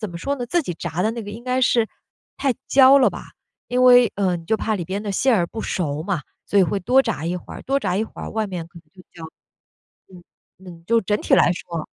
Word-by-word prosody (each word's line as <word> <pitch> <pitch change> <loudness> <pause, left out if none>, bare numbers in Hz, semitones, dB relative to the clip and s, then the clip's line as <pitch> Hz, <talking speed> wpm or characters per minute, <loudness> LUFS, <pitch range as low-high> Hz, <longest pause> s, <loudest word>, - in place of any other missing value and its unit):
怎 215 -4 -4
么 170 - -7
说 280 +10 -2
呢， 245 -3 -5
自 345 +8 0
己 175 - -5
炸 170 +1 -5
的 220 +4 +1
那 230 0 -6
个 205 - -8
应 225 +3 -10
该 255 0 0
是 235 -3 +2 0.5
太 275 -2 +1 0.2
焦 270 +1 +7
了 260 - +4
吧， - - -8 0.5
因 250 +1 +1
为 245 -3 +6
嗯， 180 -4 -1
就 220 - +1
怕 220 0 -2
里 180 -4 -3
边 195 +4 -4
的 210 - -4
馅 255 +6 +2
儿 175 -5 +1
不 220 - -7
熟 155 -5 -2
嘛， 185 -2 -2 0.2
所 205 - +1
以 - - +6
会 185 +3 0
多 255 +8 +4
炸 145 - -3
一 170 +2 -2
会 180 - -10
儿， - - -9
多 275 +1 0
炸 180 - -1
一 215 - 0
会 - - -12
儿 - - -6
外 220 -1 -2
面 180 -4 -6
可 170 - -14
能 - - -18
会 185 - -15
焦。 170 - -13 0.9
嗯， 175 -1 -14 0.5
嗯， 165 -1 -13
就 230 +3 +2
整 210 +1 -1
体 - - 0
来 - - +5
说。 170 -2 -6
205 Hz, 280 characters per minute, -21 LUFS, 175-245 Hz, 0.9 s, 焦